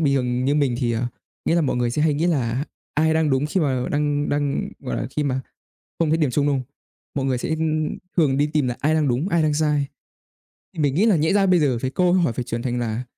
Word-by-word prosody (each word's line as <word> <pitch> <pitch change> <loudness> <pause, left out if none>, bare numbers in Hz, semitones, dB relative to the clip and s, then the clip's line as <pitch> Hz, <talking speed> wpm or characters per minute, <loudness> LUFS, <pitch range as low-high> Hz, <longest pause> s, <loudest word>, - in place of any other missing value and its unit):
bình 140 -3 +2
thường 125 -1 0
như 140 +2 +2
mình 140 -4 +2
thì, 120 -3 0
à 120 +2 -1 0.4
nghĩa - - +2
là 170 - +3
mọi 145 -6 0
người 120 -1 +1
sẽ 150 +5 0
hay 155 -2 +3
nghĩ 160 +4 0
là 130 -5 0 0.3
ai 160 +1 +2
đang 160 -2 +2
đúng 135 +2 +1
khi 185 +5 0
mà 130 -5 0
đang 145 0 0
đang 145 -1 -1
gọi 60 - -4
là, - - -2
khi 150 - +2
mà 130 -2 -1 0.6
không 165 -2 +2
thấy 160 - +3
điểm 150 -5 +1
chung, 145 +2 +1
đúng 145 - +2
không? 130 - -7 0.5
Mọi 135 - -1
người 130 -2 +1
sẽ, - - -4
ưm, 155 -1 -1 0.2
thường 140 -5 +3
đi 145 +1 +2
tìm 150 -4 +2
là 120 - -3
"ai 150 +2 +2
đang 155 -2 +2
đúng, 130 +10 0
ai 170 -2 +2
đang 155 -1 +2
sai?" 150 -2 +1 0.9
Thì - - -5
mình 140 -2 +1
nghĩ 195 +8 +3
là 215 -5 +4
nhẽ 160 +3 +2
ra 200 -1 +3
bây 180 -3 +4
giờ 130 -5 +2
phải 130 - -2
câu 180 +5 +2
hỏi 175 -9 +2
phải 125 - -3
chuyển 115 0 -4
thành 125 -1 -1
là 120 +1 -2
145 Hz, 275 wpm, -22 LUFS, 130-155 Hz, 0.9 s, là